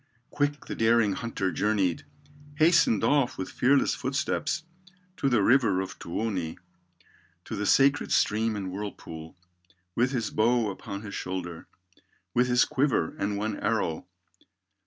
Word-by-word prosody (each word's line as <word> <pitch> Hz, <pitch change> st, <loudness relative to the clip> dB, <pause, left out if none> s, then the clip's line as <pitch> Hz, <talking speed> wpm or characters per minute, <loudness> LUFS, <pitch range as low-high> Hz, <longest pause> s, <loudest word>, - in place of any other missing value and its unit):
Quick 145 Hz, 0 st, -1 dB
the -, -, -5 dB
daring 115 Hz, -2 st, +3 dB
hunter 100 Hz, -3 st, -2 dB
journeyed, 95 Hz, -8 st, 0 dB, 0.5 s
Hastened 155 Hz, -, +4 dB
off 140 Hz, -4 st, +2 dB
with 95 Hz, -, -5 dB
fearless 135 Hz, +2 st, +3 dB
footsteps, 140 Hz, +5 st, -2 dB, 0.5 s
To 140 Hz, -, +1 dB
the 115 Hz, -6 st, +3 dB
river 115 Hz, -5 st, +4 dB
of 95 Hz, -, -5 dB
Tuoni, 90 Hz, -3 st, -3 dB, 0.9 s
To -, -, -5 dB
the 105 Hz, 0 st, -2 dB
sacred 140 Hz, +1 st, +3 dB
stream 110 Hz, +1 st, +2 dB
and 95 Hz, -3 st, -4 dB
whirlpool, 90 Hz, -5 st, -7 dB, 0.6 s
With 120 Hz, +5 st, +2 dB
his 115 Hz, -6 st, -2 dB
bow 115 Hz, -1 st, +2 dB
upon 100 Hz, +1 st, -7 dB
his 100 Hz, -, -8 dB
shoulder, 90 Hz, -2 st, -5 dB, 0.7 s
With 125 Hz, +1 st, +3 dB
his 125 Hz, 0 st, +4 dB
quiver 135 Hz, -, 0 dB
and 100 Hz, 0 st, -1 dB
one 105 Hz, 0 st, -2 dB
arrow. 105 Hz, -7 st, -1 dB
110 Hz, 135 wpm, -27 LUFS, 95-125 Hz, 0.9 s, Hastened